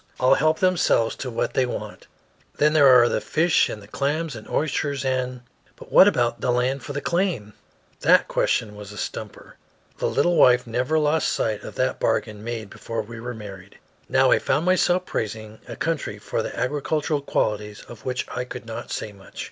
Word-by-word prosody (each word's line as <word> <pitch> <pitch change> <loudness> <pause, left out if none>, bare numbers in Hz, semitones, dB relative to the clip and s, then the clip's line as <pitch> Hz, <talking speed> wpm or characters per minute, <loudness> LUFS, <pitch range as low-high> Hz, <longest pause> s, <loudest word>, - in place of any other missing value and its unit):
All 130 +1 +5
help 155 +3 +2
themselves 180 -11 +2
to 130 - -5
what 115 - -2
they 130 -1 +2
want. - - -7 0.5
Then 150 +1 +3
there 145 -3 +6
are 125 -2 +7
the - - -1
fish 165 +1 +2
and 105 - -7
the - - -14
clams 145 +5 -2
and 110 - -10
oysters, 145 -2 -1
and 130 -1 -1 0.2
" - - -34
"But - - -14
what 190 - +8
about 120 -12 +1
the - - -1
land 125 +3 0
for 145 - -7
the 145 0 -3
claim?" 170 - -1 0.5
That - - +4
question 105 -2 0
was 105 -1 -9
a 105 - -10
stumper. - - -7 0.4
The - - 0
little 175 -1 +2
wife 125 -1 +5
never 125 +6 0
lost 155 +1 +2
sight 110 -2 -1
of - - -9
that 130 0 0
bargain 105 -2 -1
made 115 -3 -5
before 115 -1 -5
we 115 +2 -10
were 120 +1 -6
married. 100 -3 -10 0.3
Now - - +4
I - - +5
found 150 +5 0
myself 185 0 +2
praising 110 0 -5
a - - -7
country 165 -3 -2
for - - -3
the - - -6
agricultural 150 +2 -1
qualities 105 -5 -2
of 115 -2 -12
which 130 0 -2
I 125 - -3
could 125 -1 -8
not 115 0 -7
say 105 - -4
much. 100 -1 -15
125 Hz, 195 wpm, -23 LUFS, 110-150 Hz, 0.5 s, what